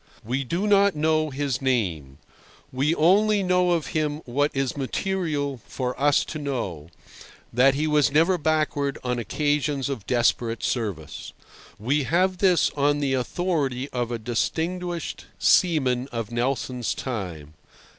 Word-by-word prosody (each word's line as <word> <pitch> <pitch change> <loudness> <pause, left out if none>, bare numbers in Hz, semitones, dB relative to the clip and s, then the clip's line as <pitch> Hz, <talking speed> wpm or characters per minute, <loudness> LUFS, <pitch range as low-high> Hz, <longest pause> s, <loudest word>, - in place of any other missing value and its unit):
We 130 +4 -1
do 170 - -2
not 200 -2 +4
know 155 0 +1
his 140 -2 -2
name; 90 - -1 0.5
we 140 +5 +1
only 200 +5 +4
know 180 -1 +2
of 165 -4 0
him 155 -1 -1
what 145 +4 +1
is 135 -2 -1
material 145 - -2
for 125 -1 -3
us 145 0 +3
to 155 - -6
know—that 120 - -2
he 150 +2 0
was 150 -2 +3
never 165 +5 +3
backward 150 -3 0
on 125 -1 -1
occasions 145 +2 -1
of 115 -8 -5
desperate 120 -1 +1
service. 100 - -3 0.4
We 135 +6 0
have 185 +3 +1
this 180 -5 +3
on 145 0 +1
the 140 -2 0
authority 135 -1 -1
of 120 -2 -2
a 120 - -1
distinguished 170 +9 -3
seaman 135 -8 +3
of 115 -3 -4
Nelson's 125 0 -1
time. 90 - -5
140 Hz, 135 wpm, -24 LUFS, 125-160 Hz, 0.5 s, not